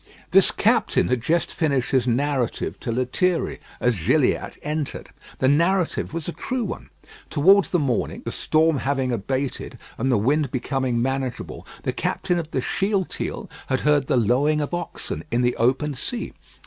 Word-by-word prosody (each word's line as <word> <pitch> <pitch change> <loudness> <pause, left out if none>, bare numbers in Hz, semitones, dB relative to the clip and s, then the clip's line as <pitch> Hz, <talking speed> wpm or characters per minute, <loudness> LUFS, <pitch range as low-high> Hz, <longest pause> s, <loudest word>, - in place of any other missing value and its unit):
This - - +6
captain - - +2
had 125 -2 +1
just 165 +7 0
finished 140 -6 0
his 130 -2 +2
narrative 130 0 0
to 120 - -3
Lethierry 130 +9 0 0.2
as 120 -5 +1
Gilliatt - - +2
entered. 150 -1 -3 0.3
The 130 - +2
narrative 170 +5 +2
was 165 -1 -4
a - - -1
true 255 +7 -3
one. - - -6 0.4
Towards 190 +6 +5
the 180 - +2
morning, 140 -7 -1
the - - -2
storm 155 -2 +2
having 135 -2 0
abated, 130 +5 -3 0.2
and 130 +3 +1
the 120 - +4
wind 140 +7 +1
becoming 130 -1 -1
manageable, 135 -1 -3 0.2
the - - -1
captain 175 -1 -1
of 160 -2 -5
the 130 - -1
Shealtiel 195 - -2 0.2
had 130 - 0
heard 145 -2 +3
the - - +2
lowing 130 +7 +2
of 145 +3 -3
oxen 175 -1 -4
in 120 +1 +1
the 120 0 +2
open 135 +5 +1
sea. 235 - -5
140 Hz, 160 wpm, -23 LUFS, 125-160 Hz, 0.4 s, This